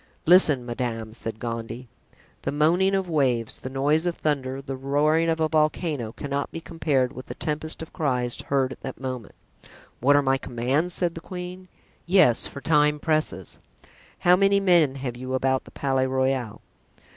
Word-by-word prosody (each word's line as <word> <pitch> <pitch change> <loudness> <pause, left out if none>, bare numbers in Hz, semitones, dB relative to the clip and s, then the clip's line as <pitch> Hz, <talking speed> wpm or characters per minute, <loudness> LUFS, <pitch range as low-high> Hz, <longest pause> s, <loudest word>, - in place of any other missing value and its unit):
"Listen, 155 -7 +5
madame," 115 -2 -4
said 115 -1 -5
Gondy. 115 +1 -5 0.5
The - - -2
moaning 175 +7 +3
of 190 -1 -1
waves, 130 -8 0
the 130 - -6
noise 145 +5 +1
of 175 - -1
thunder, 135 -3 -2
the 135 0 -5
roaring 150 +5 +2
of 165 0 0
a 160 - +2
volcano, 155 -5 0
cannot 140 +3 -4
be 165 - -5
compared 150 -6 -1
with 130 - -9
the - - -7
tempest 155 +1 -3
of 160 - -12
cries 125 -6 -1
heard 135 -2 0
at - - -10
that - - -7
moment. 130 -4 -6 0.6
"What 140 +4 +4
are 145 - +4
my 135 0 +2
commands?" 135 +9 -1
said 175 -2 0
the 165 - -8
queen. 180 +1 -8 0.4
"Yes, 175 - +4
for 140 - -9
time 150 -1 +3
presses." 155 0 -1 0.6
"How 180 0 +5
many 195 +1 +3
men 170 -8 +4
have 130 -3 -4
you 130 +1 -4
about 130 0 0
the - - -14
Palais 135 -1 0
Royal?" 130 -3 -1
140 Hz, 170 wpm, -25 LUFS, 130-160 Hz, 0.6 s, Listen